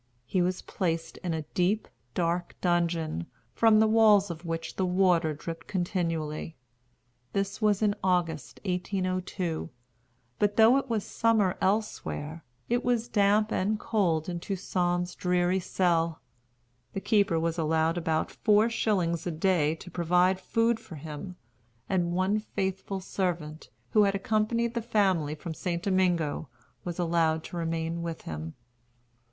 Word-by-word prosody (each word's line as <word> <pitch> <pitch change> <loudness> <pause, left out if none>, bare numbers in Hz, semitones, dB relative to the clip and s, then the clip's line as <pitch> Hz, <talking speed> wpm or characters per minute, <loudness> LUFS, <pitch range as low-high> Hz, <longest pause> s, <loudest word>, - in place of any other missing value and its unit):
He 185 +9 0
was 180 +1 -1
placed 165 -3 -2
in 175 -3 -3
a 160 - -3
deep, 190 +5 +1 0.3
dark 175 0 -1
dungeon, 170 - 0 0.3
from 220 - +5
the 220 - +6
walls 215 -3 +5
of 165 0 -8
which 165 -1 -4
the 190 - 0
water 180 -4 +3
dripped 165 +2 -7
continually. 165 -4 -2 0.8
This 195 +2 -2
was 210 -1 +2
in 205 -1 +3
August, 170 -6 0
1802. 185 -2 -2 0.7
But 205 0 +2
though 225 +4 +7
it 270 -1 -2
was 220 -3 0
summer 220 -5 +2
elsewhere, 170 -6 -1 0.2
it 240 +1 +1
was 240 -1 0
damp 210 +1 +3
and 210 +3 0
cold 175 -10 +1
in 175 -1 -3
Toussaint's 180 -1 -1
dreary 180 +1 +1
cell. 170 -3 +1 0.7
The - - -2
keeper 200 -5 +2
was 165 +1 -1
allowed 160 +1 +2
about 160 -2 -1
four 215 +1 +3
shillings 180 -7 0
a - - -1
day 160 -2 +2
to 180 +2 -11
provide 180 +2 +2
food 230 +3 +1
for 165 - -11
him; 155 +5 -7 0.5
and 175 -2 +1
one 185 +4 +1
faithful 190 -2 -3
servant, 170 -5 -3 0.2
who 210 -1 +5
had 200 0 +1
accompanied 220 +3 0
the 235 - -1
family 190 -9 +1
from 160 +2 -6
St. 170 +1 -3
Domingo, 175 -7 +1 0.3
was 175 -1 -5
allowed 165 -2 +1
to - - -8
remain 165 0 -2
with 170 -1 -5
him. 80 +1 -6
180 Hz, 140 wpm, -28 LUFS, 165-200 Hz, 0.8 s, though